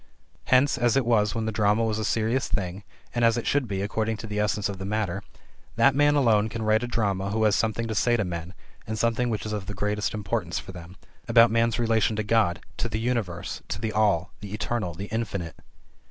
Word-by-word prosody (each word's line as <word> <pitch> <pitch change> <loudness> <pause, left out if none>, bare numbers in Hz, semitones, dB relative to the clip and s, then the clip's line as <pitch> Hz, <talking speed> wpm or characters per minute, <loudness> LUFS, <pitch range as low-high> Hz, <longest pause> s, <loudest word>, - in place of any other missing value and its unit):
Hence 130 0 +3
as 120 +1 +3
it 135 - +2
was 105 -3 +2
when 115 -1 -1
the 110 - -1
drama 105 +1 +2
was 110 -1 0
a - - -2
serious 115 +5 0
thing, 95 -1 -3 0.3
and 120 - 0
as 115 0 +4
it 120 - -3
should 140 -3 +1
be 100 -2 -2
according 110 +2 -1
to 115 - -7
the 105 -1 -3
essence 105 -1 0
of 100 -2 -6
the - - -5
matter 100 -2 -2 0.5
that 125 +4 +5
man 145 +2 +4
alone 110 -6 +3
can 115 0 -4
write 110 +1 +3
a 120 - -3
drama 100 -5 -1
who 110 +2 0
has 105 -2 +4
something 115 +1 0
to 110 - -2
say 120 +3 +2
to 105 - 0
men, 85 +1 -5 0.3
and 110 +1 -3
something 115 +2 +1
which 110 -2 -3
is 105 - -3
of 100 -3 -4
the 105 - -5
greatest 105 +1 -1
importance 100 -4 -2
for - - -6
them: 90 +1 -11 0.3
about 115 0 +6
man's 115 -1 +2
relation 115 -2 +2
to 110 - -1
God, 105 -6 +2 0.2
to 120 - -2
the 110 0 -2
Universe, 110 -8 -2
to - - -4
the 110 0 -2
All, 100 -4 +2
the 105 0 -6
Eternal, 105 -6 -2
the 100 +4 -5
Infinite. 100 -7 -4
110 Hz, 230 wpm, -26 LUFS, 100-115 Hz, 0.5 s, about